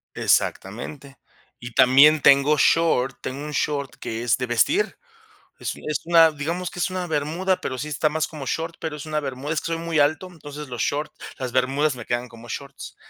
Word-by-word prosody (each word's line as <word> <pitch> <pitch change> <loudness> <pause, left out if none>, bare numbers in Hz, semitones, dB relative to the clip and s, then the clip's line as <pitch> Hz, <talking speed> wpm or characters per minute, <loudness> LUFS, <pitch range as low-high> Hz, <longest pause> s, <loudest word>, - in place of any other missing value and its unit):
Exactamente. 135 +7 -1 0.4
Y 120 0 -9
también 145 +6 +6
tengo 140 +2 +5
short 135 -4 +3
tengo 140 +3 -5
1 150 - -5
short 140 -2 -2
que 115 +1 -5
es 120 -1 +2
de 125 - -2
vestir. 290 - +1 0.6
Es - - -4
es 150 - -3
una, 165 -1 +6
digamos 165 +5 -4
que - - -10
es 175 - +1
una 185 -1 -3
bermuda, 165 +5 -1
pero 130 - -4
sí 150 - -4
está 150 +1 +1
más 160 +1 -1
como 145 -4 -8
short, 165 +5 -3
pero 160 -2 -4
es 150 - -8
una 155 -1 -1
bermuda. 140 +2 -4
Es 155 - 0
que - - -7
soy 165 0 -2
muy 165 -2 -2
alto, 155 +6 +2
entonces 150 -3 -9
los 120 -3 -6
short 150 +1 -2 0.3
las 130 -2 -4
bermudas 135 +2 +1
me 120 - -9
quedan 120 0 -2
como 115 0 -14
shorts. 140 +2 -8
145 Hz, 200 wpm, -23 LUFS, 130-160 Hz, 0.6 s, también